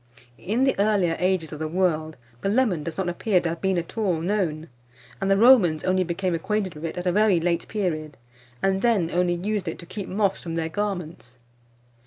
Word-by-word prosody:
In 225 +7 0
the 270 - +3
earlier 200 -5 +2
ages 180 -4 0
of 150 - -7
the 155 - -2
world, 160 -3 0 0.2
the 195 - 0
lemon 210 -7 +2
does 165 +1 -6
not 190 -2 -1
appear 180 +2 +1
to 170 - -2
have 165 0 -5
been 190 -1 +1
at 170 -1 -4
all 185 -7 +1
known, 170 -4 -1 0.5
and 195 - 0
the 195 - +4
Romans 205 -9 +5
only 185 0 +2
became 180 +1 -2
acquainted 190 +2 -1
with 150 +2 -7
it 165 - -5
at 180 - -4
a 180 - +2
very 205 -2 +3
late 170 0 -1
period, 155 -8 -3 0.5
and 195 0 +2
then 205 -8 +2
only 175 0 +1
used 200 +1 -2
it 165 - -3
to - - -11
keep 195 +2 -7
moths 200 0 0
from 165 -1 -5
their 165 -1 -1
garments. 175 -10 -4
180 Hz, 210 wpm, -24 LUFS, 165-200 Hz, 0.5 s, Romans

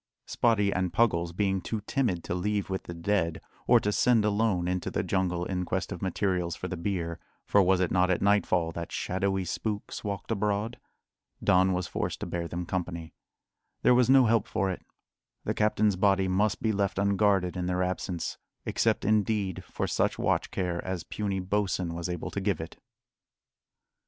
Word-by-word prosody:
Spottie 105 -4 +2
and 90 -1 0
Puggles 85 -8 +2
being 95 +1 0
too 110 +2 -3
timid 105 -6 -1
to - - -3
leave 100 +2 -1
with 95 - -3
the 85 - -6
dead, 85 -2 0 0.3
or - - +7
to 105 - 0
send 115 0 +3
alone 100 -4 +1
into 90 0 -1
the - - -1
jungle 90 -2 0
in 90 -1 -2
quest 95 +1 -2
of 90 - -5
materials 90 -3 -1
for 90 - -5
the 95 - -4
bier 85 -2 -3 0.3
for 100 - +4
was 95 0 +3
it 90 -2 +1
not 90 0 +3
at 90 - +2
nightfall 95 -4 +2
that 85 0 -6
shadowy 95 0 -1
spooks 105 +3 -4
walked 100 +1 -4
abroad? 105 +2 -1 0.6
Don 95 +1 +4
was 90 -1 -1
forced - - -3
to - - -2
bear 85 -1 -3
them 85 +1 -4
company. 85 -2 -4 0.7
There - - +6
was 125 0 +4
no 135 -1 +7
help 115 -2 +2
for 95 -3 0
it; 90 - -6 0.6
the - - -1
captain's 105 -1 +2
body 95 0 +3
must 95 +2 +1
be 110 - +2
left 100 -2 0
unguarded 100 -2 +2
in 90 -1 -2
their 90 0 +1
absence 90 -2 -3 0.3
except, - - +1
indeed, 105 -3 +1
for - - -3
such - - 0
watch - - 0
care 90 -2 -2
as 95 -3 -3
puny 100 -2 -3
Bosin 95 -2 -1
was 85 +1 -4
able 90 -2 -4
to 100 - -3
give 95 -4 0
it. 80 - -7
95 Hz, 180 wpm, -28 LUFS, 90-105 Hz, 0.7 s, or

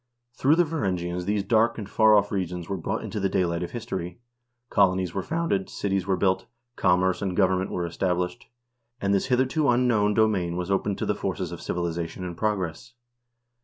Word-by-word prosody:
Through 140 +5 +3
the 175 - +4
Varangians 90 - -2
these 100 0 0
dark 115 +2 +2
and 105 -4 -5
far 110 +1 +5
off 100 0 +2
regions 90 -3 -3
were 100 - -2
brought 85 - -3
into 110 - -4
the 95 -1 +1
daylight 85 -2 0
of 90 - -3
history; 95 -7 -5 0.5
colonies 95 -3 +2
were 95 - -1
founded, 160 - -1
cities 95 -2 -2
were 95 -1 +1
built, 95 -1 +1 0.3
commerce 90 -1 +2
and 95 -3 -2
government 95 -1 +2
were 90 - -2
established, 90 +1 -2 0.5
and 100 -2 +1
this 100 - +1
hitherto 130 +4 +2
unknown 120 -4 +3
domain 95 -6 +2
was 90 +2 -3
opened 100 0 0
to - - -2
the - - +1
forces - - -3
of - - -7
civilization 85 0 -3
and 90 -1 -5
progress. 105 +2 -2
95 Hz, 180 wpm, -26 LUFS, 90-110 Hz, 0.5 s, far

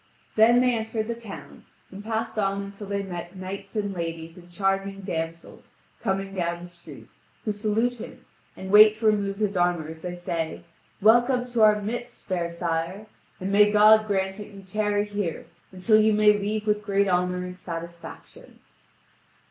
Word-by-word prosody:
Then 235 +3 +6
they 250 -1 +3
entered 220 -1 -3
the 235 - -1
town, 230 -4 -11 0.3
and 195 +2 -9
passed 225 +1 -3
on 195 0 0
until 200 +1 -9
they 200 0 -2
met 175 -1 -7
knights 195 +2 -7
and 205 -2 -1
ladies 165 -1 -5
and 175 -1 -15
charming 195 +2 -1
damsels 165 -3 -6 0.3
coming 195 -2 -2
down 170 -2 -2
the 175 - -10
street, 175 0 -14 0.3
who 215 - 0
salute 220 +4 -1
him - - -10 0.3
and 190 0 -7
wait 215 +1 +8
to 220 +1 -6
remove 200 -2 +2
his 205 -2 -1
armour 175 -3 +1
as 160 0 -10
they 180 0 -5
say: 170 -2 -4 0.4
"Welcome 240 +3 +4
to 240 -2 0
our 210 -1 +6
midst, 240 +4 -6
fair 175 -3 -2
sire! 170 +3 -3 0.3
And 190 +1 -3
may 205 +1 +6
God 215 +1 +6
grant 190 -1 -1
that 210 - -8
you 200 -1 -12
tarry 205 +1 0
here 205 -5 -4 0.3
until 205 +4 +3
you 215 0 +4
may 210 0 +5
leave 210 +1 -2
with 210 -1 +1
great 200 0 +1
honour 180 0 0
and 180 0 -9
satisfaction!" 170 - -9
200 Hz, 170 wpm, -25 LUFS, 180-215 Hz, 0.4 s, wait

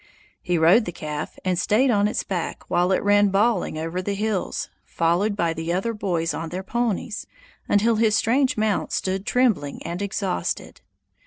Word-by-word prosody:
He 180 -1 0
rode 175 +8 +5
the 175 - -4
calf, 150 -2 -6
and 180 -2 +1
stayed 245 +8 +3
on 205 -2 +3
its 210 - -2
back 180 -4 -4
while 175 +2 +2
it 190 - +1
ran 205 0 +4
bawling 200 -3 +1
over 165 +3 -3
the 200 +2 -2
hills, 210 -1 -2 0.2
followed 175 +6 0
by 170 -4 0
the 165 +1 -3
other 195 +6 -1
boys 175 -6 -1
on 165 0 -4
their 185 +3 -5
ponies, 225 -1 -2 0.4
until 220 +2 +3
his 220 -1 +3
strange 255 +4 +2
mount 215 -1 0
stood 190 +1 -2
trembling 225 - +1
and 170 +3 -4
exhausted. 195 - -3
195 Hz, 170 wpm, -23 LUFS, 170-215 Hz, 0.4 s, rode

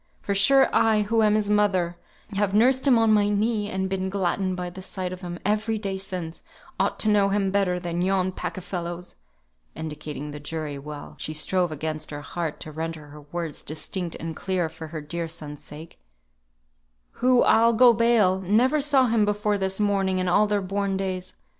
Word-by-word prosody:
For 200 - -1
sure, 270 +8 +5
I, 215 -1 +4
who 225 +2 +1
am 210 -1 +4
his 210 -1 +1
mother, 190 -5 +2 0.3
and 200 -2 -4
have 205 -1 +1
nursed 260 +5 +4
him 255 -3 +6
on 225 -1 +4
my 205 -1 +3
knee, 210 0 0
and 190 -1 -2
been 190 0 -2
gladdened 190 -1 -1
by 180 -1 -4
the 190 - -9
sight 185 -1 -5
of 185 - -9
him 175 -1 -6
every 215 +2 +1
day 195 -2 -3
since, 180 -4 -5 0.4
ought - - +1
to - - +2
know 205 -2 +4
him 195 -1 +1
better 190 -3 +1
than 175 -1 -3
yon 185 0 +1
pack 185 - -5
of 185 - -6
fellows" 175 -1 -5 0.6
(indicating 150 -2 -6
the 150 - -7
jury, 150 -1 -5
while 145 +1 -8
she 155 - -5
strove 175 +2 0
against 155 0 -4
her 145 0 -6
heart 165 0 -4
to 155 - -7
render 160 -1 -5
her 150 +1 -12
words 170 -3 -4
distinct 170 +3 -4
and 165 0 -5
clear 185 -3 -1
for 160 0 -9
her 155 0 -6
dear 165 +3 -4
son's 150 -2 -8
sake) 155 +3 -11 1.2
"who, 250 0 +5
I'll 230 +1 +5
go 240 +1 +7
bail, 220 -5 +3
never 245 +10 +3
saw 275 -2 +4
him 230 -2 +2
before 210 0 0
this 190 +1 -2
morning 195 -2 +1
in 185 0 0
all 205 +4 +4
their 205 -1 0
born 195 0 -1
days. 185 -1 -4
190 Hz, 195 wpm, -25 LUFS, 170-210 Hz, 1.2 s, go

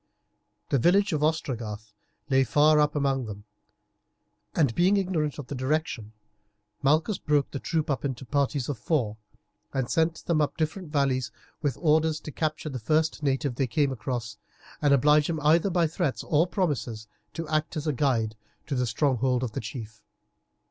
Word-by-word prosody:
The 140 - +2
village 190 - +3
of 150 - 0
Ostragarth 115 -9 -2 0.3
lay 135 -2 +4
far 150 +4 +4
up 150 0 +2
among 135 -4 0
them, 105 -1 -8 1.1
and, 140 -7 +3
being 185 - +3
ignorant 170 -7 -1
of 145 - -6
the 135 - -6
direction, 130 -5 -2 0.7
Malchus 155 +8 +2
broke 145 -2 +1
the 140 - -4
troop 160 +3 -1
up 135 -6 -1
into 135 -2 -3
parties 140 -1 0
of 140 -6 -3
four, 115 -7 0 0.6
and 130 -3 -1
sent 165 0 +1
them 165 -3 +2
up 150 - -1
different 160 +1 -3
valleys 135 -4 +1 0.3
with 145 -5 -1
orders 160 -1 +2
to 150 - -7
capture 155 0 -2
the 130 -3 -5
first 155 +6 +1
native 135 -1 0
they 130 +2 0
came 140 +3 +1
across, 120 -3 -4 0.4
and 145 -2 +3
oblige 150 +3 +4
him 160 -2 -1
either 160 +6 +4
by 175 -2 +2
threats 160 -3 -1
or 160 +3 +2
promises 120 - -2 0.3
to 165 -1 -4
act 155 +1 -1
as 150 - -3
a 150 - +1
guide 115 -5 +1 0.3
to 145 - -4
the 125 -2 0
stronghold 130 0 +1
of 120 - -2
the - - -4
chief. 110 -1 -8
145 Hz, 170 wpm, -27 LUFS, 125-155 Hz, 1.1 s, lay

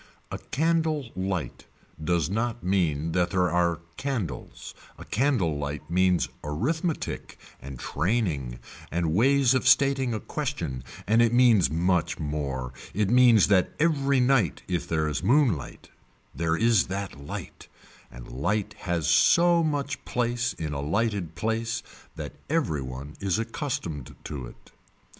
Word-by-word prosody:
A - - -4
candle 160 -4 0
light 95 -2 -3 0.4
does 85 -1 +1
not 115 +5 -2
mean 85 -5 0
that 90 +1 +1
there 90 -2 +1
are 85 -1 +1 0.2
candles, 125 - -4 0.2
a - - -10
candle 105 - +1
light 75 +2 -5
means 90 0 +3 0.2
arithmetic 150 - -2 0.2
and 70 -1 -8
training 75 - -1 0.3
and 85 -1 -1
ways 135 +5 +4
of 130 0 +1
stating 135 -2 +4
a - - -2
question 65 -9 -4 0.2
and 110 +4 +4
it 115 -1 +4
means 120 -7 +5
much 85 +1 +1
more, 70 -4 -3 0.2
it 105 -1 +1
means 120 -4 +6
that 95 -3 +3
every 140 -4 +2
night 125 - +2
if 90 -2 -2
there 80 -1 +1
is 75 - -2
moonlight 115 - +1 0.4
there 80 +3 0
is 115 -3 +3
that 95 -7 -5
light, 70 - -8 0.4
and - - -11
light 100 - -1
has 85 -5 -1
so 170 0 +5
much 145 -3 -2
place 120 0 -1
in 75 -2 -4
a 70 - -3
lighted 100 +1 -1
place 115 +2 -2 0.3
that - - -6 0.2
every 140 - 0
one 65 +3 -7
is 100 -1 0
accustomed 115 - -4
to 65 -5 -6
it. - - -16
95 Hz, 140 wpm, -26 LUFS, 80-125 Hz, 0.4 s, means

